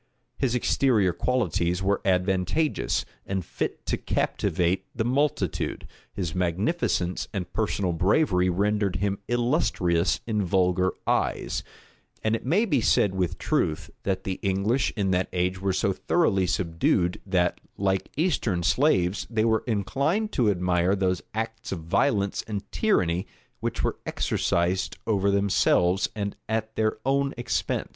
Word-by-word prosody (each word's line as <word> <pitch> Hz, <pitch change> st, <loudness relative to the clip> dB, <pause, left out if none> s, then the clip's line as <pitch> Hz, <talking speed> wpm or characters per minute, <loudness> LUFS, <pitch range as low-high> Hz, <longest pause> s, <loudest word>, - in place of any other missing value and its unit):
[*] -, -, -48 dB
His 125 Hz, -3 st, +1 dB
exterior 115 Hz, -6 st, +2 dB
qualities 90 Hz, -, 0 dB
were 100 Hz, +1 st, +1 dB
advantageous, 95 Hz, -, +1 dB, 0.2 s
and 95 Hz, -3 st, -3 dB
fit -, -, -4 dB
to -, -, 0 dB
captivate 90 Hz, +1 st, 0 dB
the 110 Hz, -, 0 dB
multitude: 140 Hz, +4 st, 0 dB, 0.3 s
his 90 Hz, -5 st, -3 dB
magnificence 90 Hz, -, 0 dB
and 95 Hz, -4 st, -5 dB
personal 100 Hz, -4 st, 0 dB
bravery 90 Hz, -, +2 dB
rendered 100 Hz, +1 st, +1 dB
him 100 Hz, 0 st, -1 dB
illustrious 115 Hz, -, +1 dB
in 110 Hz, -2 st, 0 dB
vulgar 90 Hz, 0 st, +2 dB
eyes; -, -, 0 dB, 0.6 s
and 110 Hz, +1 st, +2 dB
it -, -, -5 dB
may 180 Hz, -, +2 dB
be 145 Hz, -, +1 dB
said 100 Hz, -2 st, +3 dB
with 95 Hz, -3 st, -1 dB
truth, 75 Hz, -, -1 dB
that 95 Hz, -1 st, -2 dB
the 95 Hz, -1 st, -3 dB
English 100 Hz, +6 st, +1 dB
in 95 Hz, -2 st, +1 dB
that 90 Hz, 0 st, +1 dB
age 90 Hz, +1 st, -1 dB
were 95 Hz, 0 st, +1 dB
so 95 Hz, +1 st, +1 dB
thoroughly 95 Hz, -, +1 dB
subdued, 90 Hz, -1 st, 0 dB
that, 90 Hz, -3 st, 0 dB, 0.2 s
like 95 Hz, -1 st, 0 dB
Eastern 120 Hz, -, +1 dB
slaves, 90 Hz, -, +2 dB
they 110 Hz, -1 st, +1 dB
were 110 Hz, -1 st, +2 dB
inclined 140 Hz, -, 0 dB
to 115 Hz, -4 st, +2 dB
admire 90 Hz, 0 st, +2 dB
those 90 Hz, -4 st, 0 dB
acts 115 Hz, 0 st, -4 dB
of 90 Hz, -4 st, -3 dB
violence 100 Hz, -, +1 dB
and 105 Hz, -2 st, -3 dB
tyranny 90 Hz, -, +1 dB, 0.3 s
which -, -, -2 dB
were -, -, 0 dB
exercised 90 Hz, +2 st, 0 dB
over 100 Hz, -3 st, +2 dB
themselves, 100 Hz, -2 st, +2 dB
and 100 Hz, -1 st, -3 dB
at 110 Hz, 0 st, -2 dB
their 110 Hz, 0 st, +1 dB
own 140 Hz, +1 st, +1 dB
expense. 120 Hz, -, -2 dB
100 Hz, 140 wpm, -26 LUFS, 90-115 Hz, 0.6 s, said